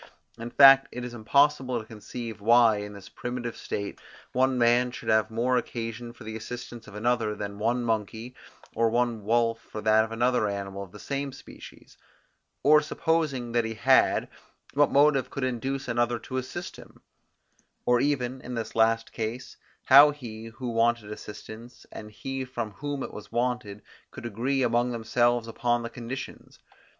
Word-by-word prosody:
In 115 Hz, +1 st, -5 dB
fact, 135 Hz, +1 st, +8 dB
it 125 Hz, 0 st, -5 dB
is 125 Hz, -, -7 dB
impossible 130 Hz, +2 st, +2 dB
to 110 Hz, -, -9 dB
conceive, 110 Hz, +1 st, -8 dB
why, 115 Hz, 0 st, +5 dB
in 105 Hz, 0 st, -6 dB
this 100 Hz, -2 st, -11 dB
primitive 120 Hz, -1 st, -5 dB
state, 100 Hz, 0 st, -5 dB, 0.3 s
one 130 Hz, 0 st, +2 dB
man 120 Hz, +1 st, +4 dB
should 125 Hz, -, -7 dB
have 110 Hz, -1 st, +3 dB
more 120 Hz, +3 st, +1 dB
occasion 115 Hz, 0 st, -4 dB
for 120 Hz, -, -14 dB
the 110 Hz, 0 st, -6 dB
assistance 120 Hz, 0 st, -8 dB
of 105 Hz, -, -12 dB
another, 110 Hz, -1 st, 0 dB
than 100 Hz, -1 st, -6 dB
one 120 Hz, +3 st, 0 dB
monkey, 110 Hz, +2 st, -2 dB, 0.4 s
or 115 Hz, 0 st, +2 dB
one 120 Hz, -2 st, 0 dB
wolf 115 Hz, +1 st, +1 dB
for 110 Hz, -, -9 dB
that 110 Hz, +1 st, +4 dB
of 110 Hz, -, -6 dB
another 120 Hz, -1 st, +1 dB
animal 100 Hz, -1 st, -5 dB
of 95 Hz, -3 st, -9 dB
the 105 Hz, -, -11 dB
same 140 Hz, +4 st, -4 dB
species; -, -, -14 dB, 0.6 s
or 150 Hz, +1 st, +6 dB
supposing 150 Hz, -6 st, -1 dB
that 120 Hz, 0 st, +2 dB
he 110 Hz, 0 st, -4 dB
had, 130 Hz, +4 st, +3 dB, 0.5 s
what 145 Hz, 0 st, +4 dB
motive 140 Hz, -2 st, +4 dB
could 135 Hz, -, -5 dB
induce 130 Hz, +2 st, -2 dB
another 120 Hz, 0 st, +1 dB
to 130 Hz, +3 st, -6 dB
assist 130 Hz, +7 st, -5 dB
him; -, -, -16 dB, 0.8 s
or 125 Hz, -1 st, +3 dB
even, 130 Hz, -3 st, -1 dB
in 125 Hz, 0 st, -6 dB
this 115 Hz, -1 st, -4 dB
last 115 Hz, 0 st, +2 dB
case, 115 Hz, +2 st, -5 dB, 0.3 s
how 140 Hz, +3 st, +9 dB
he, 115 Hz, -7 st, -8 dB
who 120 Hz, +2 st, -6 dB
wanted 115 Hz, -2 st, +1 dB
assistance, 110 Hz, +3 st, -10 dB
and 105 Hz, -, -9 dB
he 135 Hz, +5 st, -5 dB
from 120 Hz, -4 st, -5 dB
whom 145 Hz, +5 st, -4 dB
it -, -, -7 dB
was 105 Hz, -1 st, -10 dB
wanted, 120 Hz, -4 st, -2 dB, 0.3 s
could -, -, -10 dB
agree 125 Hz, +5 st, -1 dB
among 120 Hz, +1 st, +2 dB
themselves 120 Hz, 0 st, +1 dB
upon 120 Hz, +1 st, 0 dB
the 115 Hz, -, -6 dB
conditions. 120 Hz, +3 st, -8 dB
120 Hz, 170 wpm, -27 LUFS, 110-130 Hz, 0.8 s, how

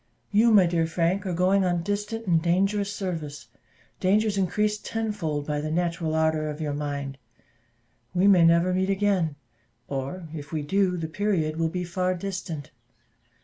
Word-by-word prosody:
You, 215 Hz, +3 st, +5 dB
my 205 Hz, -5 st, +6 dB
dear 170 Hz, -1 st, +1 dB
Frank, 175 Hz, +4 st, 0 dB
are 180 Hz, -, -1 dB
going 185 Hz, +3 st, +3 dB
on 175 Hz, -2 st, 0 dB
distant 210 Hz, +3 st, -3 dB
and 170 Hz, -4 st, +3 dB
dangerous 195 Hz, +4 st, +1 dB
service 165 Hz, -8 st, -5 dB, 0.5 s
dangers 210 Hz, +3 st, +2 dB
increased 210 Hz, +3 st, 0 dB
tenfold 205 Hz, -10 st, -2 dB
by 150 Hz, 0 st, -2 dB
the 155 Hz, -, -3 dB
natural 165 Hz, -1 st, -1 dB
ardour 160 Hz, -1 st, +1 dB
of 150 Hz, +1 st, -6 dB
your 150 Hz, -2 st, -2 dB
mind: 140 Hz, -2 st, -4 dB, 1.0 s
we 180 Hz, +2 st, +3 dB
may 185 Hz, -4 st, +6 dB
never 170 Hz, +2 st, +4 dB
meet 190 Hz, +1 st, +1 dB
again, 195 Hz, -6 st, +1 dB, 0.5 s
or 140 Hz, +6 st, -4 dB
if 150 Hz, -1 st, -7 dB
we 155 Hz, -2 st, -2 dB
do, 185 Hz, +3 st, +1 dB
the 165 Hz, -1 st, -3 dB
period 160 Hz, -3 st, -1 dB
will 165 Hz, 0 st, +1 dB
be 180 Hz, +2 st, -3 dB
far 180 Hz, +1 st, -1 dB
distant. 175 Hz, -5 st, -5 dB
175 Hz, 160 wpm, -26 LUFS, 160-195 Hz, 1.0 s, my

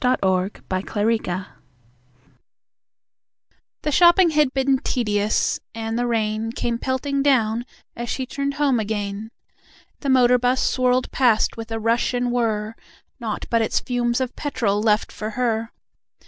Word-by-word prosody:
The 190 Hz, -7 st, +2 dB, 0.3 s
Street 190 Hz, -, -9 dB, 0.3 s
Player 185 Hz, -4 st, -4 dB, 2.3 s
The 300 Hz, -, 0 dB
shopping 345 Hz, +3 st, +6 dB
had 300 Hz, -3 st, +3 dB
been 270 Hz, 0 st, +1 dB
tedious, 210 Hz, -5 st, 0 dB, 0.2 s
and 225 Hz, 0 st, -3 dB
the 245 Hz, -, 0 dB
rain 220 Hz, -1 st, -1 dB
Came 235 Hz, -1 st, -2 dB
pelting 275 Hz, +2 st, -1 dB
down 240 Hz, -4 st, +2 dB, 0.3 s
as 235 Hz, 0 st, -5 dB
she 260 Hz, -, -2 dB
turned 280 Hz, +2 st, -3 dB
home 280 Hz, -5 st, +2 dB
again. 205 Hz, 0 st, -3 dB, 0.7 s
The 280 Hz, -, -3 dB
motor 250 Hz, -1 st, +5 dB
bus 250 Hz, +1 st, +1 dB
swirled 255 Hz, 0 st, +1 dB
past 240 Hz, -5 st, +2 dB
with 225 Hz, 0 st, -7 dB
rush 230 Hz, +2 st, 0 dB
and 245 Hz, 0 st, 0 dB
whirr, 220 Hz, -3 st, -1 dB, 0.5 s
Nought 225 Hz, -3 st, -4 dB
but 230 Hz, -1 st, +3 dB
its 220 Hz, -, +1 dB
fumes 245 Hz, -1 st, -1 dB
of 255 Hz, -1 st, -3 dB
petrol 220 Hz, -9 st, -1 dB
left 215 Hz, -1 st, +1 dB
for 215 Hz, -, -5 dB
her. 230 Hz, -2 st, 0 dB
240 Hz, 135 wpm, -22 LUFS, 220-260 Hz, 2.3 s, shopping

